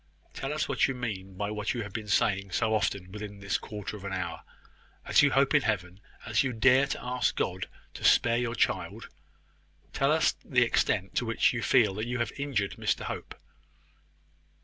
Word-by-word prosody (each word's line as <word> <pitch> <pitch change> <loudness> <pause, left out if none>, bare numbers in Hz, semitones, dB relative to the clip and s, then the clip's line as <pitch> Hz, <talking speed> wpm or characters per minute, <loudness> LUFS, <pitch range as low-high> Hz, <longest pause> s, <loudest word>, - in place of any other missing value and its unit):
Tell 135 - -4
us 155 0 -1
what 140 -3 +2
you 135 - -3
mean 95 -6 -5
by 100 +1 -2
what 105 +3 -2
you 120 - -2
have 100 -2 -9
been 110 -2 -5
saying 100 -2 +1
so 110 +4 +1
often 100 -3 -1
within 105 -1 -7
this 100 0 -1
quarter 105 0 -6
of 100 - -10
an 100 -1 -4
hour. 90 -2 -3 0.6
As - - +5
you 145 - +5
hope 135 +1 +3
in 145 - +5
Heaven 95 -6 -2 0.3
as 110 -3 +2
you 135 -2 -1
dare 130 +4 +4
to - - -4
ask 125 0 0
God - - -2 0.3
to - - -10
spare 115 +1 +4
your 120 -1 -2
child, - - -1 0.8
tell - - +2
us - - +3
the - - +3
extent 95 +2 +1
to 120 - +1
which 115 - +2
you 120 - -2
feel 110 -5 +4
that 110 +4 -4
you 125 0 -2
have 120 - -1
injured 135 -9 -2
Mr - - 0
Hope." - - -6
110 Hz, 195 wpm, -29 LUFS, 100-125 Hz, 0.8 s, As